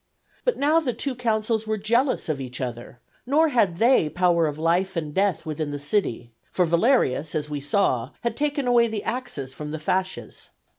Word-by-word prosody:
But - - +1
now 300 +4 +3
the 265 -7 -2
two 275 +2 -3
consuls 220 -2 -1
were 215 0 0
jealous 235 +6 +1
of 150 -4 -2
each 125 -2 -6
other; 120 -1 -6 0.3
nor 310 +4 +4
had 205 - +2
they 230 -7 +4
power 175 -1 +2
of 150 -1 -4
life 175 +4 +1
and 155 -3 -3
death 195 0 +1
within 155 -1 -3
the 145 - -4
city, 145 - -1 0.2
for 180 - +2
Valerius 170 - +2
(as 150 -1 -2
we 145 -1 -3
saw) 135 -5 +1
had 235 -1 -2
taken 290 -1 -1
away 240 -1 +4
the 215 -2 -4
axes 240 - -4
from 150 +2 -7
the 155 - -4
fasces. 185 +4 -3
185 Hz, 190 wpm, -24 LUFS, 150-240 Hz, 0.3 s, nor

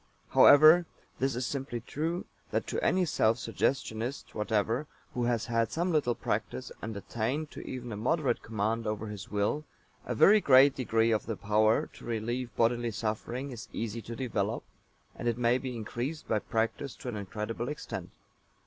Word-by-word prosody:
However, 155 +4 +8 0.3
this 135 -1 +1
is 125 0 -1
simply 135 -3 -3
true 160 +8 -3 0.2
that - - -1
to - - -3
any 185 0 +3
self 115 -7 +2
suggestionist 120 -1 -2
whatever 110 +5 0 0.3
who 120 -1 0
has 120 -2 0
had 115 -1 0
some 175 +2 0
little 140 -7 +2
practice 65 - -3
and 110 -2 -5
attained 125 +9 -2
to - - -8
even 125 -2 -5
a 105 - -4
moderate 130 +3 +1
command 110 +1 -1
over 105 0 -2
his 105 -1 -7
will, 105 +9 0 0.4
a 125 - -3
very 210 - +7
great 135 -1 +7
degree 115 -3 +1
of 110 -1 0
the 115 -3 -3
power 110 +1 +3
to - - -14
relieve 120 +2 -2
bodily 120 0 +2
suffering 115 +5 -3
is 120 -2 -8
easy 115 0 -3
to 115 +1 -7
develop, 115 -4 -2 0.5
and - - -4
it 120 -1 +1
may 120 +1 +3
be 130 -2 -5
increased 120 +7 -4
by 110 - +1
practice 115 +6 -2
to - - -10
an 120 - -3
incredible 105 +4 -4
extent. 150 - -6
120 Hz, 170 wpm, -30 LUFS, 110-135 Hz, 0.5 s, However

